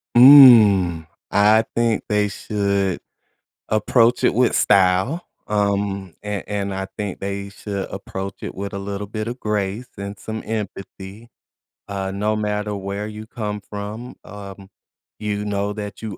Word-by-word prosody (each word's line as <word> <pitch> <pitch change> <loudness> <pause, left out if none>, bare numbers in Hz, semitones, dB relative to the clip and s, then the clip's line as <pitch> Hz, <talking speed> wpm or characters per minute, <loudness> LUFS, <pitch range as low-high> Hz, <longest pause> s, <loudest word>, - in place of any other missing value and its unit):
Mm, 110 - +8 0.2
I 105 +2 +5
think 115 -2 +1
they 105 -1 +1
should 100 -2 -1 0.7
approach 115 +3 +2
it - - +4
with 125 +1 +2
style, 100 - +2 0.2
um, 100 -3 -1
and 105 -1 -4
and 100 -1 -3
I 95 0 -3
think 105 -3 -4
they 100 0 -4
should 100 -1 -5
approach 95 +1 -6
it - - -6
with 100 +2 -5
a 100 - -4
little 100 +1 -5
bit 110 0 -4
of 120 +2 -6
grace 105 +2 -2
and 100 +1 -6
some 110 +2 -6
empathy. 105 0 -6 0.6
Uh, 95 -1 -3
no 105 +2 -1
matter 105 0 -2
where 100 +1 -4
you 110 0 -8
come 105 -2 -4
from, 105 +4 -7
um, 100 -1 -10 0.5
you 105 -1 -2
know 100 0 -2
that 105 -1 -7
you 110 -3 -6
105 Hz, 145 wpm, -21 LUFS, 100-110 Hz, 0.7 s, Mm